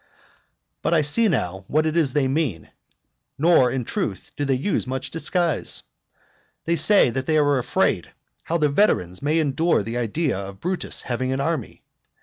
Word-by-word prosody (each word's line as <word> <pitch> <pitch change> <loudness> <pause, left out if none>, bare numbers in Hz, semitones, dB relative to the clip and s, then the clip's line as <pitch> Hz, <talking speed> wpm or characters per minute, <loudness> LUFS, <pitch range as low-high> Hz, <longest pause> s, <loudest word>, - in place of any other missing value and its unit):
But 170 - +1
I 155 - +3
see 220 +11 +4
now 95 - -2
what 155 +1 +1
it 155 0 -1
is 155 -6 +2
they 145 -3 +2
mean: 130 - -2 0.7
nor, 155 -5 +4
in 125 -1 -3
truth, 95 -4 -4
do 145 - -2
they 135 -1 +1
use 140 +3 -1
much 130 +1 -4
disguise. 165 -1 0 0.8
They 170 - +1
say 170 - +5
that 130 +2 -4
they 155 - +2
are 145 -2 +3
afraid 125 - 0 0.3
how 170 - -1
the 150 -2 +2
veterans 95 - +1
may 150 +3 +1
endure 160 -3 +1
the 115 +3 -4
idea 120 - -1
of 100 0 -8
Brutus 180 +1 -3
having 130 +1 -2
an 135 - -1
army. 150 -4 -3
140 Hz, 170 wpm, -23 LUFS, 125-165 Hz, 0.8 s, say